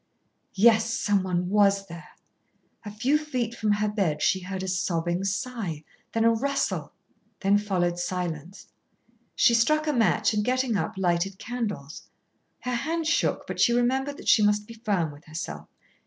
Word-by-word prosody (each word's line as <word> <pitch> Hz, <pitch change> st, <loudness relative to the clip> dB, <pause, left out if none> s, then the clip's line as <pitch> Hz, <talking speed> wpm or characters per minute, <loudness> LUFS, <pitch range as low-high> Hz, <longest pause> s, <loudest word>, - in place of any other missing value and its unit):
Yes, 225 Hz, +2 st, +4 dB
someone 190 Hz, -5 st, 0 dB
was 200 Hz, -1 st, +3 dB
there. 170 Hz, -3 st, -11 dB, 0.7 s
A 210 Hz, -, -6 dB
few 245 Hz, +9 st, +1 dB
feet 255 Hz, -7 st, -3 dB
from 215 Hz, -3 st, +1 dB
her 210 Hz, +1 st, 0 dB
bed 190 Hz, -8 st, -1 dB
she 190 Hz, -, +3 dB
heard 190 Hz, +1 st, -5 dB
a -, -, -4 dB
sobbing 175 Hz, -1 st, -1 dB
sigh, 195 Hz, -, -3 dB, 0.3 s
then 225 Hz, -, +1 dB
a 230 Hz, -, +6 dB
rustle, 275 Hz, +5 st, -1 dB, 0.5 s
then 200 Hz, +1 st, +4 dB
followed 175 Hz, -4 st, -1 dB
silence. 175 Hz, -1 st, -4 dB, 0.7 s
She 235 Hz, -, +4 dB
struck 305 Hz, +7 st, +3 dB
a 300 Hz, -, +1 dB
match 225 Hz, -4 st, +2 dB
and, 210 Hz, -1 st, +1 dB
getting 255 Hz, -1 st, 0 dB
up, 165 Hz, -5 st, -2 dB
lighted 185 Hz, +1 st, 0 dB
candles. 205 Hz, -, -5 dB, 0.6 s
Her 250 Hz, -, -3 dB
hand 320 Hz, +7 st, -1 dB
shook, 315 Hz, -, +1 dB
but -, -, -6 dB
she 240 Hz, -, +5 dB
remembered 265 Hz, +4 st, 0 dB
that -, -, -11 dB
she 220 Hz, -, +6 dB
must 210 Hz, 0 st, +2 dB
be 230 Hz, -, -11 dB
firm 205 Hz, -9 st, -1 dB
with 145 Hz, +1 st, -15 dB
herself. 80 Hz, -, -6 dB
205 Hz, 160 wpm, -26 LUFS, 180-235 Hz, 0.7 s, a